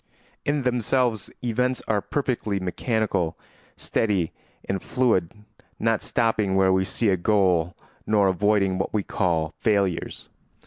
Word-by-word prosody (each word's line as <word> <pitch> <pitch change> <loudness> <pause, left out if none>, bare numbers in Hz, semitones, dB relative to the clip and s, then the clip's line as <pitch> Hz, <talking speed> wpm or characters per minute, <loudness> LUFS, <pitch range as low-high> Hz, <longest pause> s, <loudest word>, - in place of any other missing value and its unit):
In 145 -1 0
themselves 125 -2 0
events 125 +2 0
are 105 -2 +1
perfectly 120 -8 -2
mechanical, 95 -2 -1 0.4
steady, 100 -7 0 0.4
and 95 -1 -1
fluid, 115 -10 +1 0.5
not 115 -1 +1
stopping 110 -4 +1
where 95 -1 +4
we 95 0 +2
see 110 +3 0
a 95 - +3
goal 90 -3 +2 0.3
nor 105 -2 +4
avoiding 95 0 +2
what 95 - -2
we 105 - +1
call 80 -5 0
failures. 100 -5 0
100 Hz, 125 wpm, -24 LUFS, 95-115 Hz, 0.5 s, where